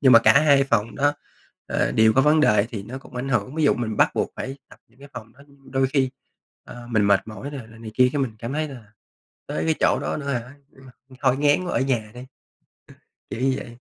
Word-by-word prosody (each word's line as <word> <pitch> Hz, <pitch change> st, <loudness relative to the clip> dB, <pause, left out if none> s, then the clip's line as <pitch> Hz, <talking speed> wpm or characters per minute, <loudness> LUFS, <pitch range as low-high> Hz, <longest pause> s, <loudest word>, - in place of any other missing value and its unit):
Nhưng 130 Hz, -3 st, +6 dB
mà 115 Hz, -, +10 dB
cả 140 Hz, +4 st, +5 dB
hai 140 Hz, -3 st, +5 dB
phòng 115 Hz, -4 st, 0 dB
đó, 145 Hz, +1 st, +2 dB, 0.5 s
ờ, -, -, 0 dB
đều 110 Hz, 0 st, +4 dB
có 135 Hz, -, +4 dB
vấn 150 Hz, +2 st, +4 dB
đề 105 Hz, -8 st, +3 dB
thì 105 Hz, -4 st, -5 dB
nó 125 Hz, +6 st, -8 dB
cũng 125 Hz, -, -14 dB
ảnh 125 Hz, +2 st, -3 dB
hưởng, 120 Hz, +1 st, -1 dB
ví 160 Hz, -1 st, 0 dB
dụ -, -, +4 dB
mình 110 Hz, -3 st, -3 dB
bắt -, -, +4 dB
buộc -, -, -1 dB
phải 135 Hz, +1 st, -5 dB
tập -, -, -16 dB
những 120 Hz, +3 st, -29 dB
cái 140 Hz, 0 st, -13 dB
phòng 115 Hz, -2 st, -9 dB
đó, 140 Hz, -, -22 dB
ưm, 135 Hz, -1 st, -20 dB
đôi 135 Hz, 0 st, +2 dB
khi, 130 Hz, -1 st, 0 dB, 0.5 s
ờ, 120 Hz, -1 st, -11 dB
mình 110 Hz, -3 st, +2 dB
mệt 100 Hz, -1 st, +4 dB
mỏi 120 Hz, +6 st, -7 dB
rồi 130 Hz, -6 st, -8 dB
là 110 Hz, -, -15 dB
này 115 Hz, -1 st, -8 dB
kia 125 Hz, 0 st, +5 dB
cái 145 Hz, -2 st, 0 dB
mình 120 Hz, -4 st, -2 dB
cảm 115 Hz, +3 st, -5 dB
thấy, 155 Hz, +1 st, -2 dB
là, 115 Hz, -6 st, -12 dB, 0.5 s
tới 80 Hz, -, -3 dB
cái 80 Hz, 0 st, +2 dB
chỗ -, -, +3 dB
đó -, -, -2 dB
nữa 140 Hz, -2 st, -6 dB
hả? 125 Hz, +2 st, -5 dB, 0.2 s
Ừm, 135 Hz, 0 st, -18 dB, 0.3 s
thôi 130 Hz, -2 st, +2 dB
ngán 145 Hz, +5 st, +2 dB
quá 175 Hz, -, -4 dB
ở -, -, +1 dB
nhà 120 Hz, -5 st, -1 dB
đi. 125 Hz, -, -9 dB
Ờ, -, -, -9 dB, 1.1 s
kiểu 115 Hz, -, -5 dB
như 135 Hz, 0 st, +2 dB
vậy. 120 Hz, 0 st, -9 dB
130 Hz, 260 wpm, -23 LUFS, 115-140 Hz, 1.1 s, mà